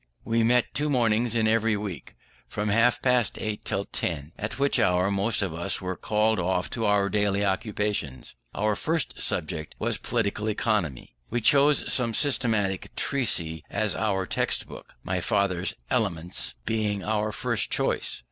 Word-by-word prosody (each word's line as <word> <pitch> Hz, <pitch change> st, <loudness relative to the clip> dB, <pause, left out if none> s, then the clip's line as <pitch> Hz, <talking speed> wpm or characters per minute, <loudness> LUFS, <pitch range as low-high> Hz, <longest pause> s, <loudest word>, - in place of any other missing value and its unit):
We 115 Hz, 0 st, +1 dB
met 120 Hz, +1 st, +2 dB
two 150 Hz, +4 st, 0 dB
mornings 120 Hz, -3 st, +2 dB
in 110 Hz, -1 st, +2 dB
every 110 Hz, -1 st, +2 dB
week, 95 Hz, -10 st, -6 dB, 0.3 s
from 105 Hz, +10 st, -2 dB
half 115 Hz, +2 st, +3 dB
past 125 Hz, -4 st, +2 dB
eight 105 Hz, -1 st, -4 dB
till 100 Hz, -2 st, -1 dB
ten, 75 Hz, -6 st, -3 dB
at 105 Hz, +1 st, -5 dB
which 140 Hz, +1 st, +2 dB
hour 90 Hz, +2 st, +3 dB
most 100 Hz, +2 st, +1 dB
of 95 Hz, -5 st, -3 dB
us 85 Hz, +2 st, -1 dB
were 95 Hz, -1 st, -3 dB
called 105 Hz, +3 st, +1 dB
off 90 Hz, +1 st, -1 dB
to 115 Hz, -, -2 dB
our 105 Hz, -1 st, +3 dB
daily 100 Hz, 0 st, +1 dB
occupations. 100 Hz, -, -2 dB, 0.2 s
Our 105 Hz, 0 st, +1 dB
first 160 Hz, +6 st, -1 dB
subject 80 Hz, 0 st, -2 dB
was 110 Hz, -1 st, -1 dB
Political 110 Hz, -3 st, -1 dB
Economy. 100 Hz, -, -1 dB, 0.2 s
We 120 Hz, -, 0 dB
chose 140 Hz, +5 st, +4 dB
some 115 Hz, -3 st, +2 dB
systematic 110 Hz, -9 st, +1 dB
treatise 90 Hz, -, 0 dB
as 105 Hz, -3 st, 0 dB
our 100 Hz, -3 st, 0 dB
text -, -, -1 dB
book; -, -, -12 dB
my 90 Hz, -1 st, -2 dB
father's 95 Hz, -1 st, 0 dB, 0.2 s
Elements 90 Hz, -5 st, -1 dB
being 105 Hz, -3 st, -1 dB
our 110 Hz, 0 st, 0 dB
first 115 Hz, 0 st, -1 dB
choice. -, -, -1 dB
105 Hz, 155 wpm, -26 LUFS, 95-115 Hz, 0.3 s, chose